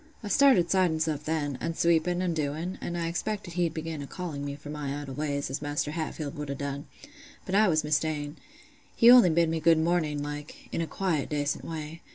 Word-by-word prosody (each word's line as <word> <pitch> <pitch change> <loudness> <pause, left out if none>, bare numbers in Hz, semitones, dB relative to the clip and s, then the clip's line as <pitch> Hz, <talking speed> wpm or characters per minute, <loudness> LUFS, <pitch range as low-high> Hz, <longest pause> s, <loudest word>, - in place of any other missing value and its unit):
I 205 - -5
started 210 -10 +5
siding 180 -4 +3
stuff 155 -2 -1
then, 150 -4 -1
an' 165 - -2
sweeping 170 +2 +2
an' 175 -2 0
doing; 160 +4 -3
and 175 - -3
I 170 - -1
expected 175 +2 -3
he'd 170 -2 0
begin 160 -2 -4
a 140 - -6
calling 160 -5 -5
me 140 0 -4
for 145 +1 -9
my 145 -1 -4
idle 140 -2 -7
ways, 140 -1 -2
as 135 - -3
Maister 145 0 -2
Hatfield 155 -2 -4
would 150 -1 -5
a' 140 - -2
done; 140 +1 -5 0.6
but 185 - -5
I 210 +2 +5
was 155 -3 +2
mista'en: 150 0 -1 0.6
he 235 +1 +8
only 245 -7 +8
bid 165 +1 +3
me 160 0 -1
good 165 0 +5
mornin' 160 -3 0
like, 145 0 -7
in - - -1
a 165 - -2
quiet 160 -3 -1
dacent 145 -1 -1
way. 160 0 -6
155 Hz, 210 wpm, -28 LUFS, 145-170 Hz, 0.6 s, he